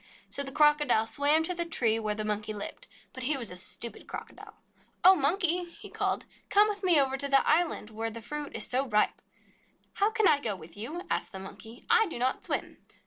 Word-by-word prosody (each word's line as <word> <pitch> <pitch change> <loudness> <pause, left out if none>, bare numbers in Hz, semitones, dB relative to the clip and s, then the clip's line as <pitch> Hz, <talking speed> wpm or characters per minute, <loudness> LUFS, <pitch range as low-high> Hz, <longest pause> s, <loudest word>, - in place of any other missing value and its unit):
So - - -1
the 270 -1 -2
Crocodile 295 -6 +3
swam 285 +7 +3
to 360 - 0
the 345 -1 0
tree 235 -9 +1
where 215 -1 -2
the 215 0 -3
Monkey 210 0 -3
lived. 210 - -7 0.3
But 260 - -8
he 290 +1 +2
was 235 -7 -4
a - - -7
stupid 215 +5 -4
Crocodile. - - -10 0.5
"Oh, 370 +2 +9
Monkey," 355 +2 +2
he 340 - -13
called, - - -2 0.2
"come 415 +1 +5
with 415 -1 -4
me 350 -5 +7
over 270 -1 +1
to 280 +1 0
the 275 -1 +3
island 315 -9 +1
where 225 +1 -3
the 230 +1 -7
fruit 295 +5 -6
is - - 0
so 265 +2 0
ripe." 210 -2 +1 0.7
"How 405 +1 +2
can 440 -3 +2
I 285 - +4
go 220 -7 -2
with 165 -2 -13
you 295 - -6
?" - - -28
asked - - -1
the - - -6
Monkey. 220 +5 -11
"I 455 -1 +4
do 330 - -6
not 255 +2 -1
swim." - - -3
275 Hz, 220 wpm, -29 LUFS, 220-340 Hz, 0.7 s, Oh